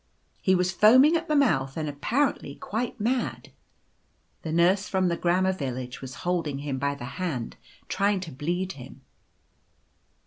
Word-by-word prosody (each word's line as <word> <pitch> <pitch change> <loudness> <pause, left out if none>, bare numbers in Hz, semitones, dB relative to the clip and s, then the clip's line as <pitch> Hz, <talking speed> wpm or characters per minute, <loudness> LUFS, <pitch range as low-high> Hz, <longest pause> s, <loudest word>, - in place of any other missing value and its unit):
He 190 - +3
was 180 0 +1
foaming 255 - +6
at 335 0 -1
the 305 - +1
mouth 135 - +2
and 155 -1 -2
apparently 145 - -1
quite 230 +3 -4
mad. 240 +4 -2 0.9
The 160 - -5
Nurse 180 +5 +3
from 185 -2 +1
the 170 - 0
Grammar 185 +2 +2
Village 130 -6 -5
was 130 -1 -7
holding 165 -6 -1
him 140 -2 -4
by 140 +1 0
the 120 - -8 0.2
hand, 135 -11 -3 0.3
trying 200 0 +1
to 170 -4 -7
bleed 175 +7 -2
him. 135 -3 -11
175 Hz, 150 wpm, -26 LUFS, 140-205 Hz, 0.9 s, foaming